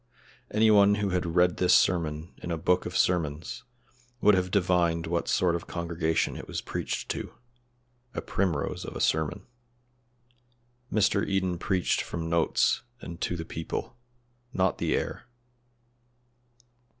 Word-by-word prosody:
Any 110 +1 +4
one 100 -1 +6
who 105 -1 -1
had 90 -1 0
read 90 -1 +4
this 90 - +5
sermon 80 -2 +1
in - - -6
a 85 - -1
book 90 +3 +1
of 90 - -3
sermons 80 -4 0 0.5
would 105 -2 +5
have 90 -1 +1
divined 90 -4 +2
what 85 +1 -1
sort 90 -2 +2
of 85 - -5
congregation 85 -2 -1
it - - -8
was - - -3
preached - - -4
to - - -4 0.8
a - - -1
primrose 90 -7 -1
of - - -7
a - - -4
sermon. 80 -1 0 1.5
Mr. 100 -1 +2
Eden 95 -3 0
preached 90 0 +1
from 80 -1 -4
notes 85 -1 +2 0.2
and 85 -5 -9
to 90 - -1
the 80 -1 -5
people 80 0 -5 0.6
not 95 -5 +1
the - - +1
air. - - -4
90 Hz, 140 wpm, -28 LUFS, 85-95 Hz, 1.5 s, one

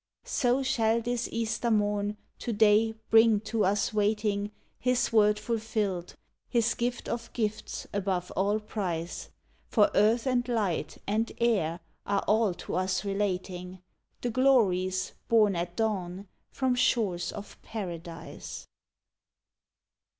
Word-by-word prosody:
So 255 +1 +1
shall 230 -3 +2
this 240 +1 -2
Easter 230 +1 -1
morn, 205 -1 +1 0.2
to 240 - -3
day, 220 +1 +4 0.2
bring 225 -1 +6
to 220 0 -1
us 200 +3 +1
waiting, 210 -1 0 0.3
His 250 -2 +1
Word 210 -1 +5
fulfilled, 215 -6 -2 0.3
His 235 -2 +2
gift 240 +1 -2
of 235 0 -4
gifts 215 -2 -3
above 190 -3 -1
all 205 +3 +2
price! 180 -6 -4 0.4
For 210 -3 +4
Earth 225 +4 +3
and 250 -2 +1
Light 200 -10 -1
and 220 +3 0
Air 190 -8 +1 0.3
are 200 0 +1
all 215 -4 +3
to - - -5
us 185 +2 0
relating 185 -2 -2 0.4
The 245 - -1
glories 190 -8 +2
borne 215 -4 +4
at 175 +1 -3
dawn 195 -3 -2 0.2
from 260 -2 +1
shores 210 -8 +1
of 205 -1 -10
Paradise! 170 -6 -7
210 Hz, 120 wpm, -29 LUFS, 190-230 Hz, 0.4 s, bring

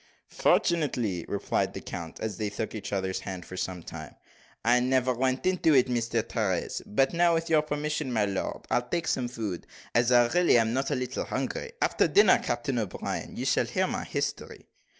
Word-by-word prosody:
"Fortunately," 125 - +1
replied - - -1
the - - -3
count, 80 -1 -7
as 110 -1 -4
they 105 -2 -2
shook 105 +2 -4
each 110 - -6
other's 95 -2 -1
hands 95 -3 -6
for 95 - -9
some 90 -2 -4
time, 80 -2 -9 0.5
"I 120 +2 +5
never 130 0 +2
went 130 +1 0
into 180 -4 +3
it, 130 -1 +5 0.2
Sir 115 -1 0
Terence. 105 -6 -2
But 135 +9 +2
now, 170 0 +4
with 165 0 -2
your 155 -1 +5
permission, 150 -2 -2
my 110 -3 +2
lord, 100 -1 -3
I'll 125 - +3
take 170 -1 -1
some 125 -2 0
food, 110 -7 -5 0.3
as 120 +1 +3
I 120 -1 +6
really 175 -5 +4
am 115 0 +2
not 135 +2 0
a 145 - 0
little 125 -1 -3
hungry. 475 - -3
After - - +3
dinner, 410 - +6
Captain - - -2
O'Brien, - - -4
you - - -4
shall - - +2
hear - - +1
my - - -3
history." - - -4
120 Hz, 190 wpm, -28 LUFS, 105-150 Hz, 0.5 s, I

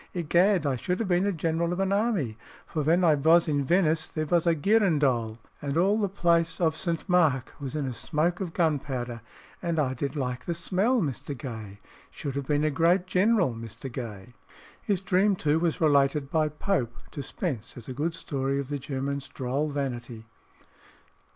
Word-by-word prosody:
Egad, 175 +1 +3
I 135 -3 +1
should 180 +8 -1
have 225 - -1
been 180 +2 +2
a - - +2
general 165 0 -1
of 175 - -2
an 195 0 +1
army, 200 - 0 0.3
for 155 - -3
ven 165 +5 +3
I 165 -3 +6
vos 160 +4 +4
in 145 -2 +1
Venice 165 +1 +2
there 155 -1 -3
vos 170 +2 +1
a 170 - +4
girandole, 145 - +2 0.2
and 140 +1 -2
all 195 +5 +3
the 200 -2 0
Place 170 -3 +1
of 160 -3 +2
St. 170 0 -2
Mark 160 -9 +2
vos 140 0 -5
in 150 -2 -1
a 130 - -3
smoke 160 +8 -1
of 180 -3 -3
gunpowder, 135 -8 -1 0.4
and 170 -2 -1
I 135 -4 +1
did 140 +4 -3
like 125 -3 -3
the 170 - -2
smell, 200 +8 +1
Mr. 140 -1 -4
Gay 110 -5 -7 0.3
should 140 - -5
have 140 -1 -3
been 150 0 +1
a 155 - +2
great 170 +5 +3
general, 185 - +2
Mr. 115 +3 -8
Gay." 115 -2 -7 0.5
His 195 -3 -1
dream, 195 +2 +3
too, 155 -2 +1
was 165 -1 0
related 140 -2 +2
by 155 -1 +2
Pope 150 - -1 0.2
to 145 - -5
Spence 130 - -4
as 120 - -10
a 130 - -5
good 160 +5 -2
story 140 -3 -2
of 140 -1 -5
the 145 -1 -2
German's 140 +1 -3
droll 135 +4 -2
vanity. 120 -5 -4
150 Hz, 190 wpm, -27 LUFS, 135-175 Hz, 0.5 s, I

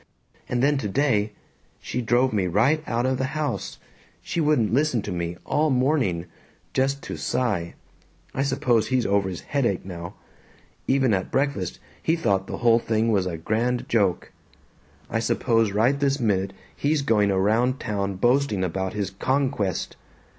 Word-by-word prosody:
And 125 0 0
then 145 0 +3
today 110 -2 +1 0.5
"She 125 - -3
drove 120 +1 +2
me 95 -3 +1
right 115 - +2
out 120 +1 0
of 130 0 0
the 130 +3 -2
house. 145 -5 -3 0.5
She 170 - -2
wouldn't 150 -8 +2
listen 135 -5 +2
to 105 - -5
me, 85 -1 -3
all 155 +1 +1
morning. 125 - +1 0.5
Just 135 +1 0
to - - -5
Cy. 100 -10 -1 0.6
I 135 - -1
suppose 135 -4 +1
he's 130 -2 +1
over 100 -1 +1
his 90 - -6
headache 120 -12 -1
now. 85 0 -7 0.7
Even 130 -4 +3
at 95 -1 -1
breakfast 135 -10 -1 0.2
he 160 - +2
thought 100 - 0
the - - -4
whole 115 0 +6
thing 115 0 +1
was 95 -3 +1
a 85 -2 -3
grand 115 +8 -1
joke. 100 -6 +1 0.8
I 115 - -1
suppose 115 -1 +1
right 120 +7 +2
this 140 0 +1
minute 100 -4 0 0.2
he's 145 0 0
going 105 -6 +3
around 110 +7 +2
town 100 -3 -2
boasting 120 -1 +2
about 95 +1 -2
his 100 -2 -2
'conquest.' 130 -3 -1
115 Hz, 155 wpm, -24 LUFS, 100-135 Hz, 0.8 s, whole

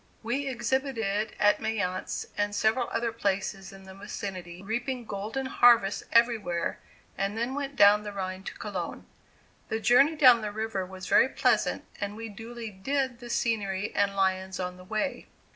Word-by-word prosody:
We 265 +5 -1
exhibited 235 -4 -1
at 205 0 +4
Mayence 195 -4 -2
and 205 0 -1
several 225 +4 +1
other 230 0 -1
places 195 -2 -2
in 195 0 -13
the 190 0 -11
vicinity, 190 -3 -7
reaping 240 +4 -3
golden 215 +6 -4
harvests 235 -6 +4
everywhere, 230 -7 +2 0.4
and 195 +2 -1
then 235 +3 -1
went 280 0 -4
down 205 -4 +7
the 210 0 -6
Rhine 185 -1 -4
to - - -5
Cologne. 190 -5 -5 0.6
The 220 - -1
journey 260 +8 +5
down 255 -6 +7
the 210 -1 -3
river 215 -3 -3
was 185 0 -9
very 260 - +5
pleasant - - +1
and 205 -1 -3
we 225 0 -6
duly 225 +2 -8
"did" 260 +5 -2
the 240 - -9
scenery 205 -4 -1
and 200 -1 +1
lions 190 -1 0
on 180 0 -4
the 180 - -12
way. 215 +8 -3
215 Hz, 160 wpm, -28 LUFS, 195-240 Hz, 0.6 s, down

